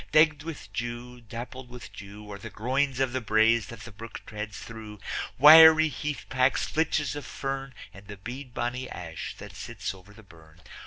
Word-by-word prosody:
Degged 155 -1 +5
with 160 -1 -8
dew, 120 +1 -5
dappled 120 +3 -8
with 125 0 -10
dew 105 +1 -10
Are 100 - -7
the 115 - -8
groins 130 +5 -1
of 130 -2 +1
the 130 - -1
braes 110 0 +3
that 115 -2 -10
the 120 - -9
brook 110 +3 -9
treads 105 -1 -6
through, 110 -2 -9 0.4
Wiry 160 +2 +9
heathpacks, 130 -2 0
flitches 150 -3 0
of 145 - -5
fern, 135 -1 -5 0.2
And 100 +1 -14
the 105 -1 -8
beadbonny 120 +3 -5
ash 80 -2 -7
that - - -10
sits - - -5
over 95 +1 -16
the 110 +1 -15
burn. 80 -3 -18
120 Hz, 170 wpm, -27 LUFS, 105-135 Hz, 0.4 s, Wiry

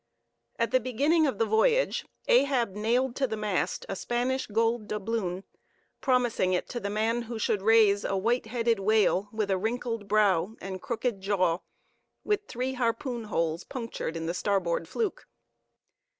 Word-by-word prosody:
At 230 0 0
the 255 - +4
beginning 290 +6 +2
of 270 - -2
the 225 - +2
voyage 340 - +2 0.2
Ahab 280 - +3
nailed 235 +5 0
to 270 - +1
the 220 -2 -4
mast 205 -4 -1
a 195 - -3
Spanish 245 +5 -1
gold 225 +1 0
doubloon, 205 -3 -2 0.6
promising 245 -8 +2
it 180 - -1
to 240 - -3
the 200 - -3
man 220 +3 0
who 235 0 -6
should 210 -2 0
raise 210 -1 +5
"a 195 - -1
white 230 +4 0
headed 230 -1 +1
whale 205 -1 +2
with 215 -2 -1
a 190 - +1
wrinkled 230 0 -3
brow 205 -1 +2
and 190 -1 -6
crooked 235 -3 -2
jaw, 185 -4 +1 0.6
with 415 0 -1
three 255 +2 -3
harpoon 240 -1 -2
holes 165 -4 -1
punctured 230 -9 -5
in 165 - -4
the 170 - -1
starboard 180 -4 0
fluke." 435 -5 -3
220 Hz, 160 wpm, -28 LUFS, 195-245 Hz, 0.6 s, raise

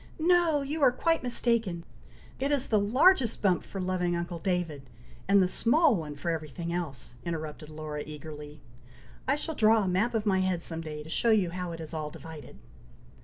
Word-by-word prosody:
"No! 330 -3 +3
you 300 +3 -3
are 265 -3 +6
quite 330 +6 +1
mistaken! 230 -8 0 0.6
It 275 +2 0
is 280 -2 0
the 215 - +4
largest 240 - +3
bump 185 -3 +3
for 195 - -7
loving 180 -1 0
uncle 170 0 -4
David, 165 -7 -2 0.4
and 200 0 +5
the - - +2
small 280 - +4
one 155 -5 -5
for 170 +4 -2
every 160 -2 -3
thing 170 +4 -5
else," 150 -9 -4
interrupted 155 -2 -5
Laura, 155 -1 -5
eagerly. 150 0 -9 0.7
"I 270 - +3
shall 320 +2 -4
draw 220 -4 +4
a - - -1
map 195 +7 +1
of 220 -1 0
my 190 -2 +3
head 185 -2 0
some 165 -1 -4
day, 150 -2 -6
to 155 - -12
show 235 - +1
you 200 -6 +3
how 180 0 -4
it 165 - -7
is 160 0 -8
all 155 -1 -3
divided." 160 0 -10
180 Hz, 195 wpm, -29 LUFS, 160-235 Hz, 0.7 s, are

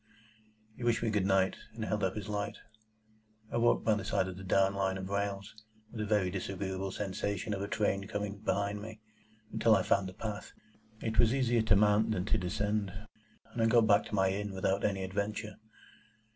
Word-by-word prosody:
He 120 - -8
wished 120 -1 +2
me 115 - +1
good 100 -3 +1
night, 95 -1 +2 0.2
and 110 -1 -3
held 105 -2 -1
up 95 -1 0
his 105 -1 -5
light. 105 0 -3 0.9
I - - -1
walked 120 0 +3
by 110 - +4
the 105 +1 -2
side 100 -3 0
of 95 - -6
the 95 - -9
down 95 +1 +3
Line 95 -1 0
of 95 0 -6
rails 100 0 -2 0.4
(with 110 - -5
a 105 - -2
very 100 -4 +2
disagreeable 95 0 -3
sensation 100 +1 -2
of 95 - -3
a 100 - -2
train 100 -2 0
coming 105 -1 -4
behind 100 0 -1
me) 110 0 -8 0.5
until 115 -1 +5
I - - +2
found 100 -1 +2
the - - -10
path. 105 -2 -5 0.5
It 110 -1 -1
was 120 +1 +5
easier 120 -3 +2
to 110 -3 +4
mount 105 +2 +4
than 95 -4 0
to 110 - +1
descend, 100 +2 -1 0.6
and 120 - -2
I 115 - +4
got 115 -1 +5
back 105 -2 +4
to - - -4
my 95 -1 +3
inn 100 0 -3
without 95 +1 0
any 95 -2 0
adventure. 105 +3 -3
100 Hz, 200 wpm, -32 LUFS, 95-110 Hz, 0.9 s, until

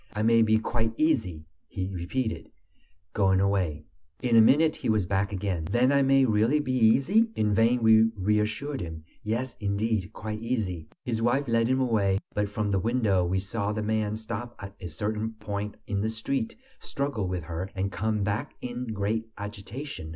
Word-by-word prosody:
"I 105 - -1
may 115 +1 +5
be 110 0 +4
quite 115 0 -1
easy!" 95 - +1 0.2
he 95 -1 -4
repeated, 100 +6 -3 0.6
going 95 -2 +3
away. 90 -6 0 0.4
In 120 -2 +2
a 115 - +9
minute 155 +7 +4
he - - -3
was 110 -4 +2
back 100 +2 0
again. 95 -4 -2
"Then 120 +9 +2
I 140 0 +4
may 135 0 +4
really 115 +6 +3
be 130 -3 -2
easy?" 135 - +4
In 105 -1 +1
vain 115 +3 +3
we 110 0 +6
reassured 105 +8 0
him. 80 -2 -6 0.2
"Yes, 115 +3 -2
indeed, 105 -1 -1
quite 105 0 -5
easy." 100 -9 -2 0.2
His 115 -2 -1
wife 130 +4 +1
led 115 -1 +2
him 130 +1 +2
away, 105 -7 +2 0.2
but 105 -1 0
from 105 0 -2
the 95 - +2
window 110 -4 +2
we 90 +2 0
saw 100 +2 -2
the 105 0 -2
man 110 0 0
stop 115 +2 -6
at 100 0 -8
a 90 - -5
certain 105 +6 -3
point 105 -1 -5
in 100 -1 -2
the 110 - 0
street, 135 - -2 0.2
struggle 140 -9 -2
with 90 -2 -3
her, 85 +4 -5
and 95 +1 -1
come 110 0 -1
back 105 +8 -2
in 125 0 -5
great 110 +2 -1
agitation. 105 - -7
110 Hz, 180 wpm, -27 LUFS, 100-120 Hz, 0.6 s, a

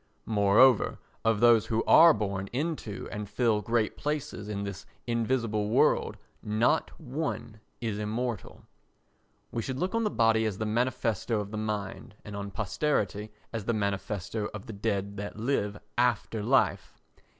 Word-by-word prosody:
Moreover 110 +3 +4 0.3
of 115 -1 +2
those 120 -3 +6
who 115 0 0
are 165 +1 +8
born 100 -5 -2
into 140 -6 -3
and 105 -1 -5
fill 110 -1 +1
great 115 +1 0
places 145 -8 -3
in 100 -1 -3
this 100 -1 -6 0.2
invisible 115 -3 0
world - - +2 0.2
not 115 +8 +1
one 140 -6 -4 0.2
is 110 -3 -2
immortal. 110 0 -3 0.9
We 115 - -2
should 130 +3 -4
look 180 +9 -1
on 230 0 +1
the 210 - +1
body 115 - +3
as 105 -3 -2
the 110 - -2
manifesto 115 -1 0
of 100 0 -5
the 110 - -4
mind 105 +1 -4
and 105 - -7
on 100 0 -4
posterity 105 +1 -1 0.2
as 110 -3 -4
the 120 - +1
manifesto 100 0 -2
of 100 - -7
the 115 - -7
dead 100 -1 -2
that 105 +1 -6
live 105 -4 -1 0.2
after 120 -2 +1
life. 100 - +1
110 Hz, 150 wpm, -29 LUFS, 105-120 Hz, 0.9 s, are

